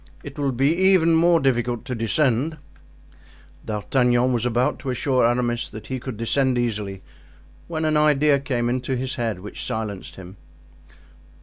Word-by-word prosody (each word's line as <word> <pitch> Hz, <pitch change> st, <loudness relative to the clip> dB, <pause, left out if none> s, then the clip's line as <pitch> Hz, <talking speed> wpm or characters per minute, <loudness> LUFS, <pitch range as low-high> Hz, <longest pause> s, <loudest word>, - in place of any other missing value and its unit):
It 145 Hz, +1 st, -9 dB
will 140 Hz, -1 st, 0 dB
be 135 Hz, +6 st, +2 dB
even 185 Hz, -3 st, +4 dB
more 170 Hz, +1 st, +4 dB
difficult 120 Hz, -4 st, 0 dB
to 125 Hz, -, -4 dB
descend." 130 Hz, +5 st, 0 dB, 1.1 s
D'Artagnan 120 Hz, +4 st, +1 dB
was 120 Hz, 0 st, 0 dB
about 120 Hz, +1 st, 0 dB
to 135 Hz, -, -5 dB
assure 130 Hz, -1 st, +2 dB
Aramis 120 Hz, 0 st, 0 dB
that 110 Hz, -, -10 dB
he 130 Hz, -1 st, -4 dB
could 125 Hz, -3 st, -7 dB
descend 130 Hz, +3 st, +1 dB
easily, 105 Hz, -5 st, -3 dB, 0.6 s
when 160 Hz, -1 st, -2 dB
an 155 Hz, -1 st, +2 dB
idea 150 Hz, -1 st, +3 dB
came 125 Hz, -4 st, -2 dB
into 130 Hz, +2 st, -1 dB
his 130 Hz, +1 st, -3 dB
head 115 Hz, -6 st, -3 dB
which 105 Hz, -, -7 dB
silenced 110 Hz, -5 st, -5 dB
him. 95 Hz, +1 st, -11 dB
125 Hz, 150 wpm, -23 LUFS, 115-140 Hz, 1.1 s, even